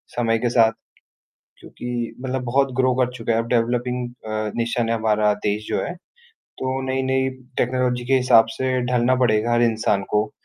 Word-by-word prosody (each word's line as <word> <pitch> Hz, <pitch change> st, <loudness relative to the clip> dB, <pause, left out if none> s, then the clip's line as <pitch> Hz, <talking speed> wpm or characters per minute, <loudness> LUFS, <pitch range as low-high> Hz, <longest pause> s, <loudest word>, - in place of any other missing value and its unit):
समय 115 Hz, -2 st, +1 dB
के 120 Hz, -, 0 dB
साथ। 115 Hz, -2 st, +4 dB, 0.9 s
क्योंकि 120 Hz, -1 st, -5 dB
मतलब 130 Hz, 0 st, -3 dB
बहुत 135 Hz, +2 st, +1 dB
ग्रो 130 Hz, 0 st, +3 dB
कर 125 Hz, -1 st, +1 dB
चुका 115 Hz, -1 st, -1 dB
है। 115 Hz, -, +2 dB
अब 115 Hz, -, -3 dB
डेवलपिंग 125 Hz, +1 st, 0 dB, 0.2 s
अ, 110 Hz, -1 st, -3 dB
नेशन 115 Hz, 0 st, -1 dB
है 115 Hz, -, +2 dB
हमारा 105 Hz, -1 st, +2 dB
देश 105 Hz, +1 st, -1 dB
जो -, -, -1 dB
है। -, -, -4 dB, 0.4 s
तो 130 Hz, 0 st, -5 dB
नई-नई 130 Hz, 0 st, 0 dB, 0.3 s
टेक्नोलॉजी 125 Hz, 0 st, 0 dB
के 135 Hz, -, 0 dB
हिसाब 125 Hz, -3 st, +5 dB
से 130 Hz, -1 st, 0 dB
ढलना 125 Hz, +1 st, +3 dB
पड़ेगा 110 Hz, 0 st, +2 dB
हर 120 Hz, -, +3 dB
इंसान 110 Hz, -3 st, +1 dB
को 105 Hz, 0 st, +1 dB
120 Hz, 170 wpm, -22 LUFS, 115-130 Hz, 0.9 s, हिसाब